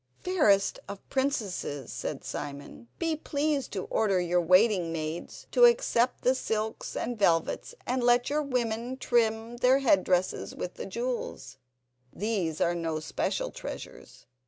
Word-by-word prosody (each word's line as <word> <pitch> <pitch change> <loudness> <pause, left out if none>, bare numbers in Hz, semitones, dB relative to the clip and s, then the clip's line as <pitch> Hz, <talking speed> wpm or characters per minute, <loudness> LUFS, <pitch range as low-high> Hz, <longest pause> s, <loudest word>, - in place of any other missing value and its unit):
"Fairest 255 - +2
of 200 -1 -8
princesses," 205 - -2
said - - -4
Simon. 145 +9 -7
"Be 330 -1 0
pleased 290 -2 -1
to 190 -3 -2
order 200 -4 +1
your 175 0 +2
waiting 185 0 +4
maids 160 +1 -5
to - - +7
accept 365 - +3
the 255 - +4
silks 220 -3 -3
and 240 -2 -3
velvets, 170 - +1
and 255 0 -1
let 245 0 +4
your 300 +1 +1
women 245 -2 -2
trim 230 -1 +1
their 250 +2 +5
head 240 -9 +3
dresses 185 0 0
with 180 - -5
the - - -7
jewels; 235 - -4 0.5
these 195 -7 -2
are 170 - +2
no 165 -2 -2
special 155 - -2
treasures. - - -9
220 Hz, 140 wpm, -28 LUFS, 180-255 Hz, 0.5 s, to